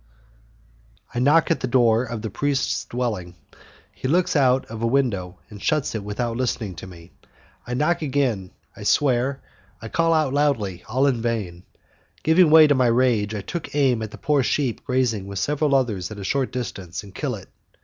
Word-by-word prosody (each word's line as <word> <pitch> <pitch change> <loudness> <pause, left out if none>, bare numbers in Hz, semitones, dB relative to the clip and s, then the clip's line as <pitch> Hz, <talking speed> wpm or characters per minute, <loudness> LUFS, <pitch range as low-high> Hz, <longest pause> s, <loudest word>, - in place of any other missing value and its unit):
I 120 - -2
knock 150 +6 +4
at 165 - +1
the - - -2
door 120 -2 +3
of 115 -2 -6
the 110 - -4
priest's 140 +4 -1
dwelling. 105 -8 -3 0.6
He - - -5
looks 175 +5 +1
out 130 -2 +3
of 115 0 -8
a 115 - +1
window 115 -9 0
and 105 -1 -10
shuts 150 +3 0
it 110 -3 -4
without 115 +3 -3
listening 115 -5 -2
to 95 - -8
me, 85 -1 -13 0.6
I 125 - -2
knock 155 +7 +1
again, 130 -10 -1 0.3
I - - -12
swear, 135 -1 +1 0.4
I 115 - -8
call 165 +5 +1
out 155 -4 +2
loudly, 115 -12 0
all 130 +5 +2
in 130 -5 +1
vain, 100 -7 -3 0.6
Giving 160 +2 +5
way 160 0 +8
to 145 - +4
my 130 -2 +3
rage, 115 -3 +2
I 105 - -3
take 165 - -6
aim 130 -5 +2
at 110 -1 -5
a - - -10
poor 150 -2 +1
sheep 130 -2 -1
grazing 125 -7 0
with 100 0 -6
several 145 +6 +1
others 110 -9 0
at 110 - -8
a 100 - -7
short 130 +7 -1
distance, 100 -9 -5
and 100 -2 -13
kill - - -3
it. - - -12
125 Hz, 190 wpm, -23 LUFS, 105-140 Hz, 0.6 s, way